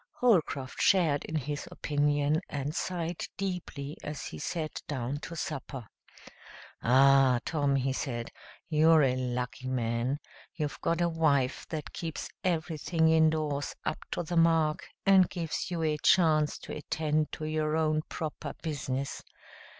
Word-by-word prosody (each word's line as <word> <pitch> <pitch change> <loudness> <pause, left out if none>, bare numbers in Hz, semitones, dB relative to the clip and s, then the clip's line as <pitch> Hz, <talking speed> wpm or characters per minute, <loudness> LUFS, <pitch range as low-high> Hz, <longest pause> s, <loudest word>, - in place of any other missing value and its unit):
Holcroft 160 - +1
shared 165 -7 +3
in 160 - -5
his 145 0 -3
opinion 145 +1 +1
and 145 +1 -3
sighed 175 -1 -3
deeply 180 -7 -4
as 150 -1 -5
he 80 - -7
sat 155 - -3
down 135 0 -3
to 170 - -7
supper. 140 -5 -5 1.0
"Ah, 135 0 +5
Tom!" 145 -4 +1
he 135 0 +1
said, 120 -4 -3 0.4
"you're 160 -1 +5
a 130 -2 +2
lucky 125 0 -3
man. 120 +1 0 0.4
You've 150 -4 -3
got 165 +1 0
a 175 - +3
wife 150 -5 +1
that 155 -3 -5
keeps 165 -2 -5
everything 160 -1 +1
indoors 155 -3 +2
up - - -1
to 175 - -2
the 170 +1 -2
mark, 165 -2 +3 0.2
and 190 -2 +6
gives 165 +1 -3
you 170 -2 -2
a 155 -1 +1
chance 155 -4 +4
to - - -6
attend 155 +1 -1
to 155 - -4
your 155 0 0
own 155 -1 +2
proper 155 -3 -5
business. 140 -3 -3
155 Hz, 140 wpm, -30 LUFS, 140-160 Hz, 1.0 s, and